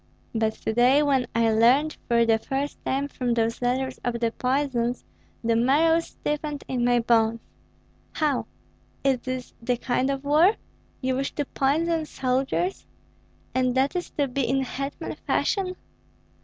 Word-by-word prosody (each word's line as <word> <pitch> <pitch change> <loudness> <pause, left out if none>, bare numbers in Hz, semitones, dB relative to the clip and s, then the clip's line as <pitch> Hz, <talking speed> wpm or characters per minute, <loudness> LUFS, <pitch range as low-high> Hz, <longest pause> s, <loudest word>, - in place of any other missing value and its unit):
But 220 -1 +1
to 220 - -4
day, 255 +5 +5
when 270 -4 +2
I 230 -1 +3
learned 255 +8 +4
for 235 -1 +3
the 225 -1 +3
first 275 +5 -4
time 275 +2 -1
from 250 -4 -2
those 230 0 0
letters 255 +1 -1
of 240 -1 -1
the 230 -1 +1
poisons, 250 -2 -1 0.4
the 230 0 +2
marrow 295 +8 +4
stiffened 300 -2 -4
in 250 -2 -1
my 245 0 +3
bones. 230 -1 +2 0.7
How? 295 -5 0 0.6
Is 270 -2 +2
this 255 0 -5
the 245 +1 0
kind 255 +2 0
of 275 0 -2
war? 315 +9 +4 0.5
You 260 -1 0
wish 275 - -2
to 290 - -1
poison 315 +4 0
soldiers? 265 +8 -1 0.7
And 255 -1 +1
that 270 +5 +2
is 355 - -2
to 285 -2 +2
be 270 +2 -2
in 265 +2 +1
hetman 275 +2 -5
fashion? 370 -2 0
260 Hz, 155 wpm, -25 LUFS, 240-285 Hz, 0.7 s, day